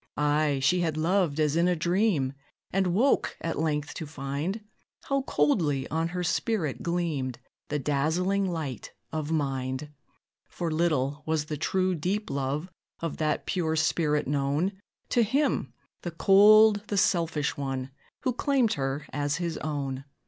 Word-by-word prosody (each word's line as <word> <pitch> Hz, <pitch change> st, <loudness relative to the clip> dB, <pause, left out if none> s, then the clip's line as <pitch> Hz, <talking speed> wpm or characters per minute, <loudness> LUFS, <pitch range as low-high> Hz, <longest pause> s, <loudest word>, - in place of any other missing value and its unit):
Ay! 150 Hz, -1 st, +2 dB
she 180 Hz, +6 st, +4 dB
had 160 Hz, -3 st, 0 dB
loved 165 Hz, -2 st, +1 dB
as 150 Hz, -1 st, +2 dB
in 170 Hz, +1 st, +3 dB
a 180 Hz, -, +2 dB
dream, 170 Hz, -5 st, +1 dB, 0.4 s
And 190 Hz, 0 st, +2 dB
woke, 220 Hz, +11 st, +2 dB
at 165 Hz, -3 st, -3 dB
length, 150 Hz, -2 st, -1 dB
to 160 Hz, -, -6 dB
find 145 Hz, +8 st, -3 dB, 0.4 s
How 275 Hz, 0 st, 0 dB
coldly 145 Hz, -, +1 dB
on 160 Hz, +1 st, 0 dB
her 180 Hz, +1 st, -3 dB
spirit 175 Hz, -, -1 dB
gleamed 160 Hz, -8 st, -1 dB, 0.3 s
The 150 Hz, -, -1 dB
dazzling 165 Hz, +8 st, +1 dB
light 155 Hz, -9 st, -5 dB, 0.2 s
of 155 Hz, -1 st, -3 dB
mind. 135 Hz, -1 st, -2 dB, 0.6 s
For 170 Hz, -2 st, -3 dB
little 150 Hz, -3 st, 0 dB
was 155 Hz, -1 st, 0 dB
the 155 Hz, -, -4 dB
true, 185 Hz, +5 st, +1 dB
deep 185 Hz, +6 st, -2 dB
love 140 Hz, +4 st, -2 dB, 0.3 s
Of 165 Hz, -2 st, -4 dB
that 155 Hz, -1 st, 0 dB
pure 160 Hz, -4 st, 0 dB
spirit 150 Hz, -2 st, +1 dB
known 145 Hz, +6 st, +1 dB, 0.4 s
To 240 Hz, -, +3 dB
him, 250 Hz, -, +1 dB, 0.3 s
the 175 Hz, -, -4 dB
cold, 205 Hz, +4 st, +6 dB
the 205 Hz, -, -2 dB
selfish 165 Hz, -6 st, +1 dB
one, 135 Hz, -1 st, -3 dB, 0.3 s
Who 255 Hz, -, 0 dB
claimed 255 Hz, -3 st, +2 dB
her 135 Hz, +1 st, -2 dB
as 145 Hz, +1 st, 0 dB
his 170 Hz, -2 st, -3 dB
own. 135 Hz, -3 st, -3 dB
160 Hz, 150 wpm, -28 LUFS, 145-180 Hz, 0.6 s, cold